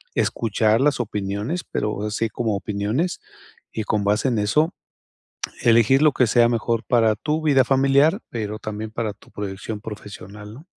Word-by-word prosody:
escuchar 110 Hz, +1 st, +1 dB
las 145 Hz, -3 st, +2 dB
opiniones, 105 Hz, -, -3 dB
pero 105 Hz, -1 st, -3 dB
así 105 Hz, +2 st, -1 dB
como 110 Hz, -1 st, -1 dB
opiniones, 105 Hz, -, -2 dB, 0.5 s
y 110 Hz, -, -3 dB
con 105 Hz, 0 st, 0 dB
base 105 Hz, +5 st, +1 dB
en 115 Hz, -4 st, 0 dB
eso, 150 Hz, -, +2 dB, 0.9 s
elegir 115 Hz, +3 st, +4 dB
lo 155 Hz, -1 st, +5 dB
que 125 Hz, -, +3 dB
sea 120 Hz, +1 st, +4 dB
mejor 115 Hz, -1 st, 0 dB
para 115 Hz, -3 st, +3 dB
tu 155 Hz, +5 st, -2 dB
vida 140 Hz, -4 st, +4 dB
familiar, 140 Hz, -, +3 dB
pero 110 Hz, -2 st, -4 dB
también 110 Hz, +1 st, -5 dB
para 110 Hz, -1 st, -3 dB
tu 100 Hz, -, -22 dB
proyección 105 Hz, +1 st, -5 dB
profesional, 105 Hz, 0 st, -9 dB
¿no? 145 Hz, +6 st, -13 dB
110 Hz, 155 wpm, -22 LUFS, 105-135 Hz, 0.9 s, lo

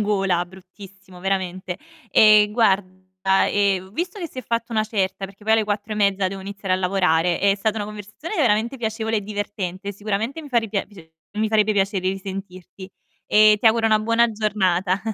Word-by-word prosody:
gola, 195 Hz, -4 st, +1 dB
bruttissimo, 190 Hz, 0 st, -15 dB
veramente. 185 Hz, -1 st, -2 dB, 0.3 s
E 215 Hz, 0 st, +6 dB
guarda, 190 Hz, -3 st, +1 dB
ehm, 195 Hz, -2 st, 0 dB
visto 355 Hz, -, -4 dB
che 345 Hz, -, -4 dB
si 260 Hz, -, -11 dB
è 255 Hz, -, -4 dB
fatta 230 Hz, 0 st, -3 dB
una 215 Hz, -1 st, +1 dB
certa, 195 Hz, -2 st, -2 dB
perché 200 Hz, +2 st, -17 dB
poi 220 Hz, -, +2 dB
alle 220 Hz, -1 st, +3 dB
4 210 Hz, +1 st, -3 dB
e -, -, -4 dB
mezza 200 Hz, -2 st, +2 dB
devo 195 Hz, 0 st, -7 dB
iniziare 200 Hz, -1 st, -4 dB
a -, -, -1 dB
lavorare, 180 Hz, -2 st, +1 dB
è 200 Hz, 0 st, +3 dB
stata 215 Hz, +2 st, -1 dB
una 205 Hz, -, -2 dB
conversazione 210 Hz, -, -8 dB
veramente 235 Hz, -2 st, +1 dB
piacevole 220 Hz, 0 st, -2 dB
e 210 Hz, -, 0 dB
divertente. 200 Hz, -1 st, -5 dB
Sicuramente 215 Hz, +9 st, -3 dB
mi 295 Hz, -, -11 dB
fa 245 Hz, -, -1 dB
ripia 215 Hz, -3 st, -2 dB, 0.5 s
mi 215 Hz, 0 st, +1 dB
farebbe 215 Hz, -1 st, +3 dB
piacere 195 Hz, -1 st, 0 dB
risentirti. 190 Hz, -1 st, -7 dB, 0.4 s
E 215 Hz, 0 st, +5 dB
ti 230 Hz, -, +2 dB
auguro 225 Hz, 0 st, +4 dB
una 215 Hz, -1 st, +4 dB
buona 230 Hz, +2 st, +2 dB
giornata. 195 Hz, -2 st, 0 dB
205 Hz, 180 wpm, -22 LUFS, 190-220 Hz, 0.5 s, E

